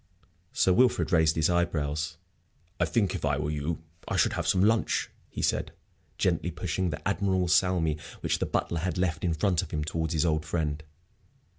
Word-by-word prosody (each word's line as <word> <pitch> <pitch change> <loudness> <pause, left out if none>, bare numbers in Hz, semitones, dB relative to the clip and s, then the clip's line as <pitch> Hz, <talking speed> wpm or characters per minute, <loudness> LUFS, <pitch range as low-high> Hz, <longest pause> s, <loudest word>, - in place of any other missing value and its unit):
Sir 95 - +3
Wilfrid 125 -1 +3
raised 80 -2 +4
his 80 -1 +3
eyebrows. 80 -2 -1 0.6
"I - - +3
think, 105 -5 +1
if 95 - -4
I 70 -2 +1
were 75 +1 -2
you, 75 +2 -3 0.2
I - - -2
should - - +3
have - - -2
some 95 0 +3
lunch," 110 +2 +2 0.2
he - - -5
said, - - 0 0.4
gently 85 -1 +1
pushing 90 +2 -2
the 75 - -4
admirable 95 -2 +1
salmi 90 -4 +2 0.2
which - - 0
the - - -1
butler 85 - -1
had 90 0 -2
left 90 -3 -1
in 85 -3 +1
front 90 +2 +1
of - - -7
him 75 -1 -2
towards 80 +1 -2
his 80 +1 +2
old 80 -2 +1
friend. 75 -3 -2
85 Hz, 185 wpm, -28 LUFS, 75-90 Hz, 0.6 s, raised